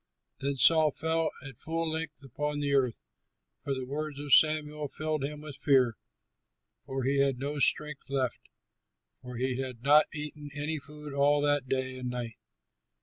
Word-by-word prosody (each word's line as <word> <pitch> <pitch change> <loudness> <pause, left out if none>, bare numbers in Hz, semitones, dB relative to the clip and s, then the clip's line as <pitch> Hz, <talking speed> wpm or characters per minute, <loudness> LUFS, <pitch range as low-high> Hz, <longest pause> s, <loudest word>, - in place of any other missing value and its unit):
Then 140 +1 -1
Saul 155 +3 +6
fell 160 +2 0 0.2
at 135 -4 -12
full 165 0 -2
length 160 -2 -4
upon 145 +3 -3
the 145 -1 0
earth, 130 -4 +2 0.7
for 140 - -1
the 130 -1 -4
words 150 +2 -4
of 145 -2 -1
Samuel 150 -1 +4
filled 155 0 -3
him 150 +1 -4
with 150 -2 -9
fear, 130 -5 +3 0.9
so 135 0 -3
he 135 +2 +1
had 135 -2 +1
no 145 +3 -3
strength 150 0 +2
left, 130 -3 -1 0.8
for 125 -1 -8
he 130 +1 -1
had 130 -3 -5
not 150 +2 +6
eaten 150 -1 -6
any 150 +2 -2
food 150 +1 -9
all 145 +1 +3
that 145 -3 +1
day 130 -1 -2
and 125 -1 -4
night. 120 -3 -5
145 Hz, 165 wpm, -29 LUFS, 130-150 Hz, 0.9 s, Saul